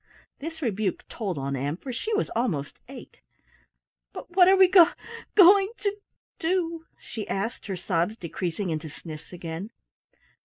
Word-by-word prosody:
This 320 Hz, +2 st, -6 dB
rebuke 215 Hz, -5 st, -1 dB
told 195 Hz, -8 st, -4 dB
on 140 Hz, 0 st, -2 dB
Ann, 140 Hz, +4 st, -2 dB
for 255 Hz, +5 st, -7 dB
she 435 Hz, -, -4 dB
was 425 Hz, -, -1 dB
almost 190 Hz, -, -2 dB
eight. -, -, -12 dB, 0.9 s
"But -, -, -9 dB
what 360 Hz, -2 st, +7 dB
are 380 Hz, -, +7 dB
we 380 Hz, -1 st, +7 dB
go 355 Hz, -2 st, +7 dB, 0.5 s
going 390 Hz, +2 st, +7 dB
to 405 Hz, -2 st, -1 dB, 0.4 s
do?" 330 Hz, -1 st, -1 dB
she 215 Hz, -3 st, -7 dB
asked, 220 Hz, +5 st, -3 dB
her 195 Hz, -, -2 dB
sobs 180 Hz, +3 st, -1 dB
decreasing 175 Hz, +1 st, -3 dB
into 155 Hz, 0 st, -4 dB
sniffs 155 Hz, +1 st, -10 dB
again. 170 Hz, +2 st, -6 dB
215 Hz, 150 wpm, -26 LUFS, -, 0.9 s, what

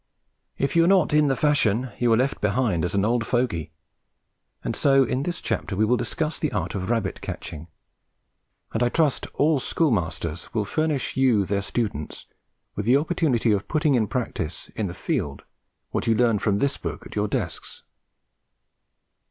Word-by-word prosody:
If 140 Hz, -, -1 dB
you 165 Hz, 0 st, +5 dB
are -, -, +2 dB
not 185 Hz, -5 st, +4 dB
in 150 Hz, -1 st, +5 dB
the 135 Hz, -, +2 dB
fashion 130 Hz, -4 st, +1 dB
you 120 Hz, -1 st, +3 dB
are 115 Hz, -, +5 dB
left 130 Hz, +3 st, 0 dB
behind 105 Hz, -4 st, +1 dB
as 90 Hz, +2 st, -1 dB
an 100 Hz, 0 st, +2 dB
old 120 Hz, +1 st, +1 dB
fogey, 115 Hz, -, -1 dB, 0.9 s
and -, -, -2 dB
so 135 Hz, -1 st, +4 dB
in 130 Hz, +1 st, -1 dB
this 175 Hz, +4 st, -3 dB
chapter 100 Hz, -, -2 dB
we 110 Hz, +3 st, +3 dB
will 120 Hz, +3 st, +3 dB
discuss 155 Hz, +5 st, -2 dB
the 155 Hz, -, -1 dB
art -, -, -2 dB
of 95 Hz, 0 st, -3 dB
rabbit 115 Hz, -5 st, -1 dB
catching; 80 Hz, +2 st, -7 dB, 1.1 s
and 115 Hz, -, -1 dB
I 120 Hz, -, +3 dB
trust 155 Hz, -1 st, +1 dB
all 150 Hz, -1 st, +3 dB
schoolmasters 90 Hz, -, -1 dB
will 105 Hz, -2 st, +1 dB
furnish 155 Hz, +3 st, -1 dB
you, 125 Hz, -7 st, +3 dB
their 100 Hz, +2 st, 0 dB
students, 100 Hz, -8 st, -3 dB, 0.5 s
with 105 Hz, -, -3 dB
the 125 Hz, +3 st, +6 dB
opportunity 145 Hz, -7 st, +1 dB
of 100 Hz, -1 st, 0 dB
putting 155 Hz, -2 st, +2 dB
in 115 Hz, -4 st, +2 dB
practice 115 Hz, -, -4 dB
in -, -, -1 dB
the -, -, -6 dB
field 70 Hz, -1 st, -2 dB, 0.5 s
what -, -, -2 dB
you 115 Hz, -, +4 dB
learn 115 Hz, -3 st, +3 dB
from 100 Hz, -1 st, +1 dB
this 140 Hz, +6 st, 0 dB
book -, -, -5 dB
at -, -, -10 dB
your 105 Hz, 0 st, +1 dB
desks. -, -, -4 dB
120 Hz, 175 wpm, -24 LUFS, 100-140 Hz, 1.1 s, the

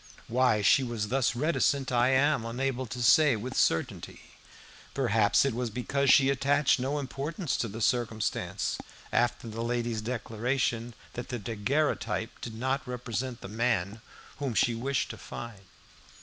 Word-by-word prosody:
Why 120 Hz, -3 st, +2 dB
she 135 Hz, -, +5 dB
was 115 Hz, -5 st, -3 dB
thus 130 Hz, -2 st, +1 dB
reticent 140 Hz, -1 st, +1 dB
I 120 Hz, +1 st, +3 dB
am 135 Hz, -1 st, +3 dB
unable 130 Hz, +2 st, -2 dB
to 120 Hz, +2 st, -4 dB
say 135 Hz, +6 st, +6 dB
with 125 Hz, +5 st, -5 dB
certainty. 80 Hz, -, -1 dB, 0.6 s
Perhaps 115 Hz, -3 st, +3 dB
it 135 Hz, -, 0 dB
was 120 Hz, 0 st, -2 dB
because 135 Hz, +4 st, -1 dB
she 135 Hz, 0 st, +6 dB
attached 140 Hz, +1 st, +2 dB
no 135 Hz, +4 st, -1 dB
importance 145 Hz, +4 st, -3 dB
to 115 Hz, -, -1 dB
the 110 Hz, +2 st, -7 dB
circumstance, 110 Hz, -6 st, -1 dB, 0.3 s
after 120 Hz, 0 st, +1 dB
the 115 Hz, +1 st, -5 dB
lady's 120 Hz, -1 st, -1 dB
declaration 120 Hz, 0 st, -2 dB, 0.2 s
that 120 Hz, -, -6 dB
the 125 Hz, -, -2 dB
daguerreotype 115 Hz, +1 st, -1 dB
did 115 Hz, -2 st, -6 dB
not 130 Hz, +4 st, -1 dB
represent 125 Hz, 0 st, -4 dB
the -, -, -7 dB
man 110 Hz, -1 st, -1 dB, 0.4 s
whom 135 Hz, -5 st, -3 dB
she 120 Hz, +3 st, +3 dB
wished 130 Hz, +3 st, -1 dB
to -, -, -10 dB
find. 115 Hz, -4 st, -8 dB
120 Hz, 150 wpm, -29 LUFS, 115-135 Hz, 0.6 s, say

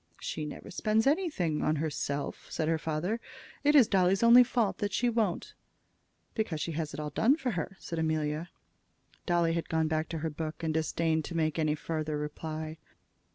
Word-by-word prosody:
"She 155 Hz, -, -4 dB
never 150 Hz, -, -8 dB
spends 215 Hz, +4 st, +1 dB
anything 275 Hz, -, +1 dB
on 155 Hz, -, +2 dB
herself," 145 Hz, -2 st, -3 dB
said 155 Hz, -, -1 dB
her 160 Hz, 0 st, +1 dB
father. 165 Hz, +9 st, -1 dB, 0.4 s
"It 295 Hz, +1 st, +4 dB
is 260 Hz, -7 st, +8 dB
Dolly's 190 Hz, +1 st, +3 dB
only 240 Hz, +2 st, +9 dB
fault 235 Hz, -4 st, 0 dB
that 205 Hz, -2 st, -2 dB
she 245 Hz, -, +2 dB
won't." 220 Hz, -6 st, -1 dB, 0.8 s
"Because 200 Hz, -9 st, -2 dB
she 165 Hz, -, -2 dB
has 155 Hz, -1 st, -3 dB
it -, -, -6 dB
all 150 Hz, -1 st, -4 dB
done 235 Hz, -, +4 dB
for 270 Hz, -6 st, -2 dB
her," 190 Hz, +1 st, -4 dB
said 165 Hz, -, -5 dB
Amelia. 155 Hz, +1 st, -1 dB, 0.8 s
Dolly 170 Hz, -2 st, +2 dB
had 170 Hz, 0 st, -2 dB
gone 160 Hz, -1 st, +1 dB
back 155 Hz, 0 st, -1 dB
to 165 Hz, -, -3 dB
her 160 Hz, -, -1 dB
book, 155 Hz, +2 st, -5 dB
and 160 Hz, -1 st, 0 dB
disdained 160 Hz, 0 st, +1 dB
to 170 Hz, -, -4 dB
make 155 Hz, 0 st, 0 dB
any 155 Hz, -1 st, +2 dB
farther 155 Hz, -1 st, -3 dB
reply. 155 Hz, +1 st, -5 dB
160 Hz, 185 wpm, -30 LUFS, 155-205 Hz, 0.8 s, only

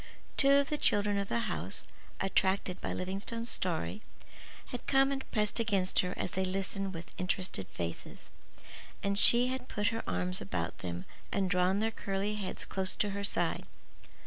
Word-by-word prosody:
Two 275 Hz, 0 st, +5 dB
of 280 Hz, 0 st, +4 dB
the 300 Hz, -, 0 dB
children 205 Hz, 0 st, +3 dB
of 200 Hz, -, -3 dB
the 235 Hz, -, +1 dB
house, -, -, +2 dB, 0.4 s
attracted 190 Hz, -1 st, +1 dB
by -, -, -2 dB
Livingstone's 200 Hz, +5 st, -3 dB
story, 185 Hz, +4 st, -2 dB, 0.7 s
had 245 Hz, -, -6 dB
come 270 Hz, 0 st, +4 dB
and 270 Hz, -1 st, -4 dB
pressed 210 Hz, +1 st, 0 dB
against 200 Hz, -5 st, +2 dB
her 180 Hz, 0 st, 0 dB
as -, -, -2 dB
they 190 Hz, -, 0 dB
listened 195 Hz, +1 st, 0 dB
with 165 Hz, +1 st, -8 dB
interested 185 Hz, -, -2 dB
faces, 85 Hz, -3 st, -6 dB, 0.7 s
and 200 Hz, 0 st, +1 dB
she 245 Hz, +3 st, +7 dB
had 260 Hz, 0 st, -3 dB
put 210 Hz, 0 st, +1 dB
her 225 Hz, 0 st, -2 dB
arms 90 Hz, 0 st, 0 dB
about 90 Hz, -4 st, -3 dB
them 90 Hz, 0 st, -4 dB, 0.3 s
and 190 Hz, -2 st, +1 dB
drawn 180 Hz, +2 st, +3 dB
their 225 Hz, +1 st, +1 dB
curly 200 Hz, -1 st, -2 dB
heads 200 Hz, -3 st, -3 dB
close 190 Hz, 0 st, -1 dB
to 205 Hz, -, +1 dB
her 200 Hz, +1 st, -3 dB
side. 200 Hz, -, 0 dB
195 Hz, 170 wpm, -32 LUFS, 185-220 Hz, 0.7 s, she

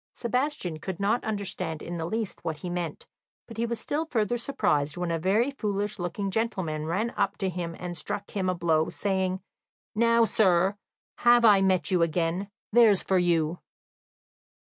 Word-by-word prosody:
Sebastian 240 Hz, -, -1 dB
could 185 Hz, +2 st, -5 dB
not 210 Hz, +4 st, +1 dB
understand 185 Hz, -6 st, -3 dB
in 175 Hz, -, -5 dB
the 165 Hz, 0 st, -3 dB
least 220 Hz, +1 st, -3 dB
what 160 Hz, -2 st, -3 dB
he 175 Hz, +3 st, -6 dB
meant, 175 Hz, -3 st, -4 dB, 0.4 s
but 230 Hz, -, -10 dB
he 235 Hz, +1 st, 0 dB
was 235 Hz, -1 st, -2 dB
still 305 Hz, +7 st, -2 dB
further 235 Hz, -5 st, 0 dB
surprised 150 Hz, -, 0 dB
when 175 Hz, -1 st, -2 dB
a 165 Hz, -, 0 dB
very 210 Hz, -, +2 dB
foolish 205 Hz, -5 st, -2 dB
looking 180 Hz, +3 st, -3 dB
gentleman 185 Hz, -8 st, -2 dB
ran 210 Hz, +8 st, -1 dB
up -, -, -1 dB
to 195 Hz, -, -1 dB
him, 170 Hz, -2 st, -4 dB
and 175 Hz, -1 st, -5 dB
struck 200 Hz, +3 st, -4 dB
him 190 Hz, -2 st, -1 dB
a 185 Hz, -, 0 dB
blow, 160 Hz, -2 st, +1 dB
saying: 190 Hz, -1 st, -1 dB, 0.5 s
"Now, 230 Hz, +1 st, +4 dB
sir, 195 Hz, -4 st, +3 dB, 0.4 s
have 240 Hz, 0 st, +5 dB
I 205 Hz, -3 st, +7 dB
met 190 Hz, 0 st, +2 dB
you 180 Hz, -2 st, +3 dB
again? 170 Hz, +4 st, 0 dB, 0.2 s
There's 215 Hz, -4 st, +5 dB
for 190 Hz, -1 st, +2 dB
you!" 170 Hz, -1 st, +1 dB
190 Hz, 170 wpm, -27 LUFS, 170-220 Hz, 0.5 s, I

